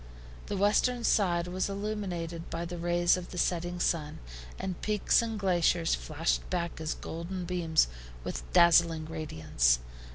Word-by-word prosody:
The 200 Hz, -, -2 dB
western 235 Hz, +5 st, +2 dB
side 175 Hz, -6 st, +2 dB
was 185 Hz, +2 st, -2 dB
illumined 190 Hz, -5 st, -4 dB
by 165 Hz, +1 st, -3 dB
the 175 Hz, 0 st, -6 dB
rays 175 Hz, +1 st, +2 dB
of 180 Hz, -1 st, -7 dB
the 180 Hz, -, -8 dB
setting 175 Hz, 0 st, -1 dB
sun, 155 Hz, -3 st, 0 dB, 0.4 s
and 185 Hz, -2 st, -5 dB
peaks 210 Hz, +2 st, +2 dB
and 225 Hz, -2 st, -3 dB
glaciers 175 Hz, -3 st, +2 dB
flashed 160 Hz, +2 st, -1 dB
back 170 Hz, -3 st, -2 dB
his 160 Hz, 0 st, -2 dB
golden 175 Hz, +3 st, -5 dB
beams 170 Hz, -, +2 dB, 0.4 s
with -, -, -4 dB
dazzling 170 Hz, -2 st, +5 dB
radiance. 80 Hz, -, +1 dB
175 Hz, 140 wpm, -30 LUFS, 165-185 Hz, 0.4 s, dazzling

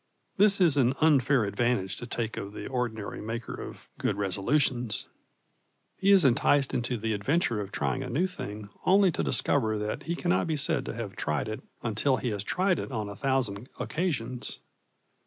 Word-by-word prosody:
This 200 Hz, 0 st, +5 dB
is 165 Hz, -6 st, +4 dB
an 130 Hz, -1 st, +3 dB
unfair 140 Hz, -5 st, +4 dB
advantage 100 Hz, -2 st, 0 dB
to 120 Hz, -, -6 dB
take 115 Hz, -2 st, -2 dB
of 100 Hz, +1 st, -6 dB
the -, -, -7 dB
ordinary 120 Hz, -5 st, -3 dB
maker 115 Hz, +2 st, -5 dB
of -, -, -9 dB
good 100 Hz, -, 0 dB
resolutions. 120 Hz, +5 st, 0 dB, 0.9 s
He 195 Hz, -, +1 dB
is 195 Hz, -5 st, +7 dB
enticed 135 Hz, +2 st, +3 dB
into 120 Hz, 0 st, 0 dB
the 110 Hz, 0 st, -1 dB
adventure 115 Hz, +1 st, 0 dB
of 100 Hz, -1 st, -7 dB
trying 130 Hz, -, -1 dB
a 130 Hz, -, -5 dB
new 155 Hz, +10 st, +1 dB
thing 105 Hz, -, -6 dB
only 190 Hz, 0 st, +5 dB
to -, -, -2 dB
discover 110 Hz, +9 st, +2 dB
that 105 Hz, +1 st, -3 dB
he 170 Hz, -, +1 dB
cannot 175 Hz, 0 st, +1 dB
be 160 Hz, -2 st, 0 dB
said 140 Hz, -, +1 dB
to -, -, -4 dB
have 110 Hz, -4 st, -5 dB
tried 75 Hz, +4 st, -1 dB
it 110 Hz, 0 st, -5 dB, 0.2 s
until 120 Hz, +4 st, +1 dB
he 125 Hz, -, -2 dB
has 100 Hz, -3 st, -2 dB
tried 185 Hz, -, +1 dB
it -, -, -5 dB
on 110 Hz, -4 st, -3 dB
a 100 Hz, -, -7 dB
thousand 125 Hz, -2 st, -1 dB
occasions. 145 Hz, -8 st, -2 dB
120 Hz, 180 wpm, -28 LUFS, 105-145 Hz, 0.9 s, is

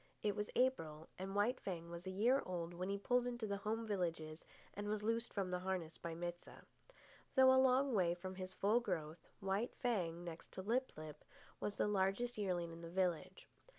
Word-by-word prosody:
It 205 Hz, -2 st, +2 dB
was 210 Hz, 0 st, -2 dB
April, 165 Hz, -12 st, +1 dB
and 195 Hz, +1 st, -4 dB
White 220 Hz, +5 st, +3 dB
Fang 170 Hz, -3 st, -4 dB
was 170 Hz, +2 st, -6 dB
a -, -, 0 dB
year 230 Hz, +8 st, +4 dB
old 175 Hz, -2 st, -3 dB
when 180 Hz, +2 st, -3 dB
he 200 Hz, -, 0 dB
pulled 245 Hz, +4 st, +2 dB
into 240 Hz, -2 st, -2 dB
the 200 Hz, -1 st, -1 dB
home 220 Hz, +3 st, -1 dB
villages 165 Hz, -6 st, -2 dB, 0.3 s
and 205 Hz, +1 st, -4 dB
was 210 Hz, 0 st, -1 dB
loosed 230 Hz, +2 st, 0 dB
from 190 Hz, -3 st, -1 dB
the 180 Hz, -, 0 dB
harness 180 Hz, -3 st, -2 dB
by 165 Hz, -1 st, -4 dB
Mit 175 Hz, +1 st, -3 dB
sah. -, -, -13 dB, 0.7 s
Though 260 Hz, -1 st, +8 dB
a 260 Hz, -, +7 dB
long 265 Hz, +1 st, +4 dB
way 175 Hz, -4 st, +3 dB
from 185 Hz, +1 st, -5 dB
his 185 Hz, 0 st, -5 dB
full 205 Hz, +5 st, +3 dB
growth, 170 Hz, -8 st, -3 dB
White 195 Hz, +5 st, 0 dB
Fang, 175 Hz, -9 st, 0 dB
next 170 Hz, -1 st, -7 dB
to 190 Hz, -, -5 dB
Lip 250 Hz, +6 st, +1 dB
lip, 155 Hz, -1 st, -8 dB, 0.4 s
was 205 Hz, -, -2 dB
the -, -, +3 dB
largest 205 Hz, +4 st, +1 dB
yearling 180 Hz, -5 st, -1 dB
in 165 Hz, 0 st, -9 dB
the 165 Hz, -, -6 dB
village. 180 Hz, -2 st, -1 dB
190 Hz, 205 wpm, -40 LUFS, 170-220 Hz, 0.7 s, Though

